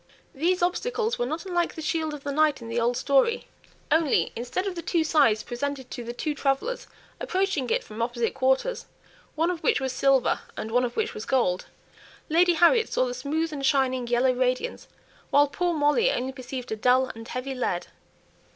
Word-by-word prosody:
These 350 +5 +1
obstacles 460 +6 -1
were 485 - 0
not 325 +5 -4
unlike 350 -2 -1
the 320 - -6
shield 315 -1 -1
of 285 - -11
the 285 - -3
knight 305 +1 +2
in 230 -1 -9
the 235 +1 -1
old 240 +1 +1
story; 280 - +2 0.5
only 320 -2 +3
instead 245 - -3
of 390 - -2
the 340 - -5
two 335 -1 +1
sides 280 -9 +3
presented 265 +1 -4
to 240 - -5
the 235 - -5
two 295 +5 -3
travellers 285 - -1 0.3
approaching 370 -9 -1
it - - +1
from 220 +1 -7
opposite 235 -1 -1
quarters, 265 - 0 0.5
one 330 +3 +1
of 340 -2 -5
which 470 - +2
was 265 -1 -2
silver, 270 -1 +3 0.2
and 220 - -5
one 250 +2 +3
of 240 - -5
which 445 +1 0
was 435 - -6
gold, 210 -9 +1 0.6
Lady 345 +3 +4
Harriet 350 +8 +4
saw - - +2
the - - -3
smooth 320 -4 -2
and 280 -2 -5
shining 260 -3 +2
yellow 245 +2 +3
radiance, 255 - -1 0.4
while 285 +1 +5
poor 350 +5 -1
Molly 315 +10 +3
only 260 +2 -2
perceived 255 -2 -7
a - - 0
dull 250 +4 +3
and 225 0 -10
heavy 255 +2 -4
lead. 210 -9 -2
280 Hz, 195 wpm, -26 LUFS, 250-345 Hz, 0.6 s, while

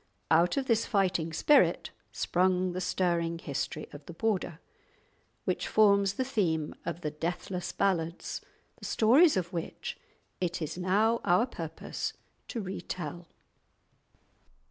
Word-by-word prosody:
Out 170 +5 +4
of 270 - +1
this 230 -3 +2
fighting 185 -5 +1
spirit 290 - +3 0.2
sprung 185 0 +1
the 180 +1 -3
stirring 170 -2 0
history 150 0 -4
of 145 0 -10
the 170 - -7
Border, 180 -4 -1 0.9
which - - -1
forms 200 -2 +4
the 260 - 0
theme 165 - 0
of 170 0 -3
the 150 - -2
deathless 175 +3 -3
Ballads, 170 -4 -1 0.4
the - - -10
stories 265 - +5
of 180 0 -2
which 170 -1 -5 0.4
it 175 -1 -1
is 160 -1 -4
now 205 +6 +2
our 180 +7 +4
purpose 165 -10 -5 0.3
to 230 - -4
retell. 175 -3 -5
180 Hz, 125 wpm, -30 LUFS, 165-200 Hz, 0.9 s, stories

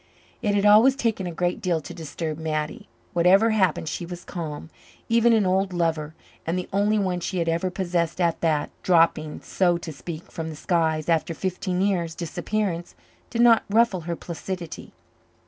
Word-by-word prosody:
It 205 -3 +1
had 200 0 +2
always 220 +6 +7
taken 225 -8 -1
a - - -3
great 175 +1 -1
deal 175 -3 +1
to 175 +3 -9
disturb 160 -1 -5
Mattie. 155 +6 -3 0.3
Whatever 190 +6 +5
happened 190 -7 +1
she 175 - -3
was 175 0 -7
calm. 160 -2 -6 0.4
Even 235 +1 +4
an 220 -3 +4
old 190 +1 +1
lover, 160 -3 -1 0.3
and 165 +3 -1
the 180 - -3
only 205 +2 +2
one 185 -3 0
she 185 +2 -3
had 170 -1 0
ever 170 +3 0
possessed 175 -2 -1
at 170 -2 +1
that, 155 -3 +1
dropping, 165 -3 +2
so 175 -2 +1
to 165 -2 -7
speak, 155 +5 -8
from 160 -1 -5
the 155 - -7
skies, 160 -1 0
after 165 0 +1
fifteen 185 0 -2
years' 175 -5 0
disappearance, 175 0 -3 0.3
did 235 -1 +2
not 230 -2 +6
ruffle 215 -3 +3
her 170 - 0
placidity. 175 +1 -6
175 Hz, 175 wpm, -24 LUFS, 165-195 Hz, 0.4 s, always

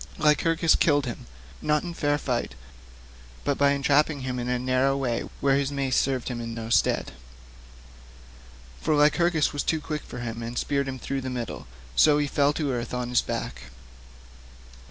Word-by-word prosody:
Lycurgus 160 +2 +3
killed 145 -3 +3
him, 120 - -6 0.3
not 150 0 +1
in 175 -1 -5
fair 145 -3 +1
fight, 120 - -2 0.9
but 145 - +1
by 140 0 +5
entrapping 145 +1 +2
him 130 -1 -3
in 120 0 -3
a 125 - +1
narrow 130 +2 +1
way 125 -4 -2
where 135 -1 +3
his 140 0 -1
mace 135 -2 -1
served 130 -2 +1
him 120 -1 -3
in 115 -1 -5
no 115 0 -6
stead; - - +2 1.7
for 155 - +1
Lycurgus 155 +2 +3
was 145 - -1
too 160 - 0
quick 150 0 -4
for - - -10
him 115 -1 -5
and 115 +1 -5
speared 140 -1 0
him 130 -1 -4
through 135 +2 -3
the 130 - -4
middle, 120 - -5 0.3
so 150 - +6
he 150 - +1
fell 145 0 +2
to 150 -2 -2
earth 120 0 -3
on 125 -1 -3
his 125 - +3
back. - - -5
140 Hz, 175 wpm, -26 LUFS, 125-150 Hz, 1.7 s, so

